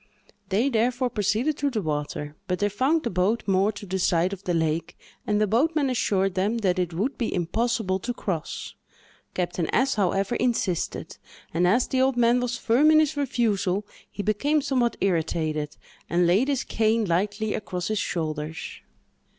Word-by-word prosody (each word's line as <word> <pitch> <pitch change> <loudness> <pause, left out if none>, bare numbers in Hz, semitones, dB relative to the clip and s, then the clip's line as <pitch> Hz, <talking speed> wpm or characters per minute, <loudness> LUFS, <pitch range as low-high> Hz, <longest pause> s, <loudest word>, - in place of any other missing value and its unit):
They, 210 +7 +2
therefore, 245 +1 +1
proceeded 220 +8 0
to 285 - +1
the 220 -6 -2
water, 150 -1 -3
but 180 -1 0
they 205 +2 +1
found 270 +10 +1
the 235 - -2
boat 195 +5 +1
moored 195 +2 +2
to 205 - -8
the 190 0 -2
side 175 +1 +2
of 195 0 -8
the 180 - 0
lake, 160 0 -1 0.3
and 210 0 +2
the 215 - +4
boatman 280 - +2
assured 195 -5 +1
them 200 +5 0
that 185 0 +2
it 180 -1 0
would 205 +12 -2
be 235 - -1
impossible 190 +2 0
to 245 - -3
cross. 190 -9 -4 0.6
Captain 175 -2 -1
S——, 270 +2 +2
however, 195 +2 +1
insisted, 230 -8 -1 0.4
and, 175 +2 +2
as 235 +7 +3
the 260 - +1
old 265 -1 +2
man 240 +1 +4
was 245 -1 -2
firm 245 +7 +4
in 310 0 +6
his 310 -1 +2
refusal, 215 -8 0 0.2
he 205 - -5
became 285 +9 +1
somewhat 255 -4 +1
irritated, 160 -4 -1 0.3
and 175 +1 +3
laid 195 +10 +3
his 275 -3 0
cane 220 0 +1
lightly 205 +4 0
across 180 -3 -4
his 215 -1 0
shoulders. 155 -3 -4
205 Hz, 175 wpm, -25 LUFS, 180-245 Hz, 0.6 s, in